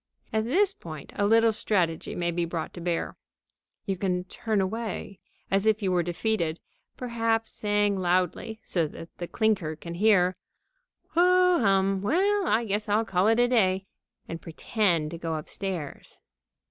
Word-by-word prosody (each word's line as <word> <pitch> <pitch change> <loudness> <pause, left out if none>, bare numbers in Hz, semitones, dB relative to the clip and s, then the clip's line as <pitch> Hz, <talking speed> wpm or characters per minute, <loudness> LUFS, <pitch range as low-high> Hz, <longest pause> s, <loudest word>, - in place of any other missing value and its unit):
At 220 0 +1
this 390 - +3
point 155 - -10
a 205 - +1
little 225 +1 +5
strategy 180 -6 0
may 175 -1 -1
be 170 0 -1
brought 165 -1 -4
to 175 - -8
bear. 170 -1 -2 0.7
You 195 -2 -2
can 180 -1 -1
turn 215 +3 -2
away, 200 -1 -3 0.3
as 195 +2 +3
if 215 0 +2
you 190 - +1
were 180 -1 +3
defeated, 175 -1 -1 0.4
perhaps 230 -2 -1
saying 205 -1 +1
loudly, 185 +5 0
so 170 -4 0
that 165 +2 -11
the 175 - -4
clinker 200 -9 0
can 170 +2 -8
hear: 185 -1 +3 0.7
"Ho 360 +1 +4
hum! 195 -2 +2
Well, 385 - +2
I 230 +2 +2
guess 210 0 -1
I'll 215 +2 +2
call 195 -1 +1
it 225 +1 +4
a 245 - +5
day," 190 -6 +2 0.4
and 165 - -6
pretend 170 -2 0
to 170 - -6
start 165 -2 -2
upstairs. 175 -3 -6
195 Hz, 160 wpm, -27 LUFS, 175-225 Hz, 0.7 s, little